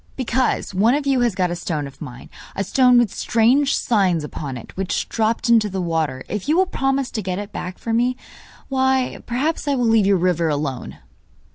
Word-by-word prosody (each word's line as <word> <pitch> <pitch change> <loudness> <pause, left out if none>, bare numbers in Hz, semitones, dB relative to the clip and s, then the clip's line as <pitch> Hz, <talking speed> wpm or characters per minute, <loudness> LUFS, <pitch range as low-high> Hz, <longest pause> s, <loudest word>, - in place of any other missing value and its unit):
'Because 255 -4 -1
one 220 +7 +3
of 290 -1 -2
you 270 -2 +2
has 240 -5 +1
got 180 -2 0
a - - -2
stone 155 -4 -3
of 140 0 -12
mine 125 -4 -9 0.3
a 195 - -1
stone 250 +4 +4
with 240 -5 +2
strange 250 +5 +2
signs 190 -8 +1
upon 145 -3 -6
it 115 - -12
which 190 -1 -2
dropped 225 +1 0
into 225 -3 +4
the 190 0 -4
water. 160 -7 -2
If 210 +6 -4
you 315 - +3
will 375 - +4
promise 270 -5 -1
to 220 - -3
get 185 -2 -3
it 205 0 -6
back 180 0 -6
for 230 - -4
me, 245 +2 +1 0.5
why, 265 -1 0
perhaps 290 +6 -1
I 285 - +2
will 245 -2 0
leave 225 -3 +3
your 200 -1 +4
river 170 -2 +1
alone. 145 -3 -3
220 Hz, 210 wpm, -21 LUFS, 175-255 Hz, 0.5 s, stone